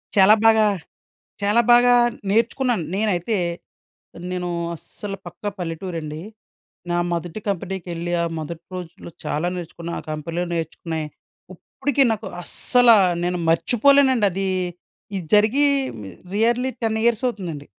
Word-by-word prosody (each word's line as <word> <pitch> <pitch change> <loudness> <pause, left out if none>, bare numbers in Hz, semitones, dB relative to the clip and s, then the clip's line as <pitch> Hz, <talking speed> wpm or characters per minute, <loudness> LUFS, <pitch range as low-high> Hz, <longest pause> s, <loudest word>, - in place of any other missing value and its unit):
చాలా 200 +2 +7
బాగా, 220 -1 +6 0.8
చాలా 210 +4 +4
బాగా 245 0 +7 0.4
నేర్చుకున్నాను. 230 -1 +1
నేనైతే 210 0 0 1.0
నేను 180 -1 -3 0.3
అస్సలు 195 +4 -8
పక్కా 205 - -5
పల్లెటూరండి. 165 -2 -5 0.7
నా 175 - +1 0.2
మొదటి 170 +4 -4
కంపెనీకెళ్ళి, 175 -2 -4
ఆ - - +1
మొదటి 160 +2 -7
రోజుల్లో 175 0 -8
చాలా 155 +4 -1
నేర్చుకున్న. 170 -1 -7
ఆ - - -8
కంపెనీలో 165 +3 -3
నేర్చుకున్నాయి. 160 -1 -4 0.5
ఇప్పటికి 275 +8 0
నాకు 220 - -3 0.2
అస్సలా 245 -3 +4 0.3
నేను 180 0 -1
మర్చిపోలేనండి. 255 +5 +4
అది 195 +1 -2 0.7
ఇది 180 -4 -4
జరిగి 220 +8 +4 0.4
మి 95 - -8 0.2
రియర్‌లీ 235 +4 +2
10 220 -1 +1
ఇయర్స్ 235 +1 +2
అవుతుందండి. 175 -11 -5
190 Hz, 115 wpm, -22 LUFS, 170-225 Hz, 1.0 s, చాలా